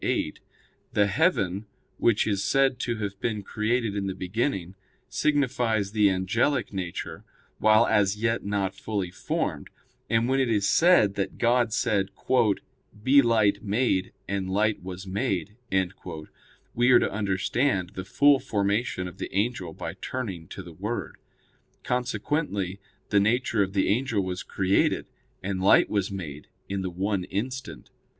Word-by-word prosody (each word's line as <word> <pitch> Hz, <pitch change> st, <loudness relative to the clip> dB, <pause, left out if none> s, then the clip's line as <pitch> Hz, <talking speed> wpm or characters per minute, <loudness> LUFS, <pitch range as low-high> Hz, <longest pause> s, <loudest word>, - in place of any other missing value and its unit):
ii, -, -, -1 dB, 0.2 s
8), -, -, -10 dB, 0.5 s
the 105 Hz, -, +4 dB
"heaven," 100 Hz, -, +1 dB, 0.3 s
which 115 Hz, -3 st, +3 dB
is 100 Hz, -2 st, 0 dB
said 135 Hz, +3 st, +2 dB
to 120 Hz, -2 st, -1 dB
have 100 Hz, -3 st, -5 dB
been 105 Hz, -2 st, -2 dB
created 110 Hz, +1 st, -1 dB
in 100 Hz, -1 st, -2 dB
the 95 Hz, -, -3 dB
beginning, 95 Hz, -1 st, -2 dB, 0.3 s
signifies 120 Hz, -7 st, +1 dB
the 105 Hz, -2 st, +4 dB
angelic 105 Hz, +8 st, 0 dB
nature 90 Hz, -3 st, -5 dB, 0.4 s
while 110 Hz, +2 st, +5 dB
as 105 Hz, -3 st, +2 dB
yet 115 Hz, +1 st, 0 dB
not 100 Hz, -2 st, -1 dB
fully 100 Hz, -5 st, -3 dB
formed: -, -, -3 dB, 0.4 s
and 115 Hz, +1 st, +2 dB
when 135 Hz, +1 st, +2 dB
it 130 Hz, -3 st, +2 dB
is 105 Hz, -3 st, +2 dB
said 170 Hz, -, +5 dB
that 100 Hz, -1 st, -3 dB
God 120 Hz, -1 st, +2 dB
said: 105 Hz, -4 st, +1 dB, 0.9 s
"Be 140 Hz, +3 st, +6 dB
light 110 Hz, -4 st, +2 dB
made: 105 Hz, -2 st, +1 dB, 0.2 s
and 100 Hz, -1 st, -2 dB
light 105 Hz, +2 st, +1 dB
was 95 Hz, +1 st, -7 dB
made," 95 Hz, 0 st, -2 dB, 1.2 s
we 120 Hz, +2 st, +3 dB
are 125 Hz, -, +8 dB
to -, -, +1 dB
understand 100 Hz, 0 st, 0 dB
the 95 Hz, -, -6 dB
full 140 Hz, +8 st, +4 dB
formation 100 Hz, -2 st, -1 dB
of 90 Hz, -, -11 dB
the -, -, -5 dB
angel 100 Hz, -5 st, -1 dB
by -, -, -6 dB
turning 95 Hz, -11 st, -4 dB
to 100 Hz, -, -8 dB
the 85 Hz, -1 st, -11 dB
Word. 105 Hz, +8 st, -4 dB, 0.7 s
Consequently, 125 Hz, -, -1 dB, 0.3 s
the 105 Hz, -, +4 dB
nature 115 Hz, +1 st, +2 dB
of 95 Hz, -1 st, 0 dB
the 95 Hz, -, +2 dB
angel 115 Hz, -1 st, +1 dB
was 90 Hz, 0 st, -3 dB
created, 95 Hz, 0 st, +1 dB, 0.4 s
and 95 Hz, 0 st, -2 dB
light 95 Hz, -, +5 dB
was 100 Hz, -3 st, 0 dB
made, 80 Hz, -7 st, -7 dB, 0.2 s
in 100 Hz, 0 st, -2 dB
the 95 Hz, -, -2 dB
one 95 Hz, +2 st, -1 dB
instant. 125 Hz, +8 st, -5 dB
105 Hz, 150 wpm, -26 LUFS, 95-120 Hz, 1.2 s, are